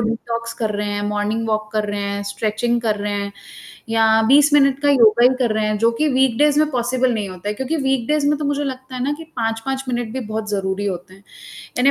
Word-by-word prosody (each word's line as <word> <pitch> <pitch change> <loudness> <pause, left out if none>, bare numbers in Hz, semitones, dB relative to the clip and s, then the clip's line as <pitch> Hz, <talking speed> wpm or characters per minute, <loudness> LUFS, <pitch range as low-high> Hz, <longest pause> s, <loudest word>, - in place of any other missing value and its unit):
Detox 230 +1 -3
कर 220 -2 -2
रहे 210 - -2
हैं, 205 0 -2
मॉर्निंग 210 +2 -1
वॉक 215 0 -1
कर 215 -1 0
रहे 205 0 -3
हैं, 200 0 -3
स्ट्रेचिंग 220 +4 -1
कर 215 -2 0
रहे 205 0 -3
हैं 200 0 -3 0.6
या 225 0 +3
20 290 +3 +5
मिनट 275 -2 +4
का 290 - +4
योगा 235 -3 +5
ही - - +8
कर 240 -4 +1
रहे 215 0 0
हैं 215 0 -1
जो 230 +2 +3
कि 300 +6 0
वीकडेज़ 265 +3 +3
में 305 0 +1
पॉसिबल 250 0 0
नहीं 210 -3 -3
होता 185 +2 -7
है, 210 - -1
क्योंकि 265 +8 -2
वीकडेज़ 270 +1 0
में 295 - +2
तो 300 - -3
मुझे 290 0 -1
लगता 260 -1 -6
है 250 - -3
ना 285 - 0
कि 325 - -9
5-5 230 +4 -2
मिनट 240 -3 -2
भी 260 - -3
बहुत 215 0 -4
ज़रूरी 195 0 -2
होते 185 0 -5
हैं। 195 +1 -20 0.5
यानी 270 +3 +5
230 Hz, 235 wpm, -20 LUFS, 210-265 Hz, 0.6 s, ही